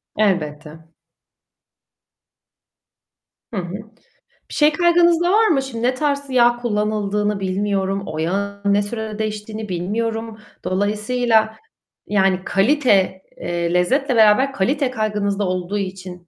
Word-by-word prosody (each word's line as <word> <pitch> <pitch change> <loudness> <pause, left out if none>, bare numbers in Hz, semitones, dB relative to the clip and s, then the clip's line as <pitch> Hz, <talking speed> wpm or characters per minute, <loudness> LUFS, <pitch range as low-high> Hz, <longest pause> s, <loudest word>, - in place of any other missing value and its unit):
Elbette. 160 -5 -2 2.7
Hı - - -3
hı. 180 -1 -4 0.8
Bir - - -10
şey 300 0 +4
kaygınız 345 0 +4
da 350 - +2
var 440 +2 +4
mı? 290 -8 +2
Şimdi 240 -4 -6
ne 250 - +2
tarz 280 +1 -2
yağ 240 -2 +4
kullanıldığını 210 -2 -1
bilmiyorum, 195 0 -1
o 155 0 -6
yağın 200 +4 -1
ne 205 - +3
sürede 215 0 -5
değiştiğini 215 0 -4
bilmiyorum. 225 +5 -3 0.3
Dolayısıyla, 220 +3 +1 0.5
yani 190 -2 +2
kalite, 195 -4 +2 0.2
eee, 170 0 -2
lezzetle 255 +10 +1
beraber 225 +5 +4
kalite 270 +5 0
kaygınız 210 -4 -1
da 205 - 0
olduğu 185 +2 -2
için 185 -3 -6
210 Hz, 120 wpm, -20 LUFS, 190-240 Hz, 2.7 s, şey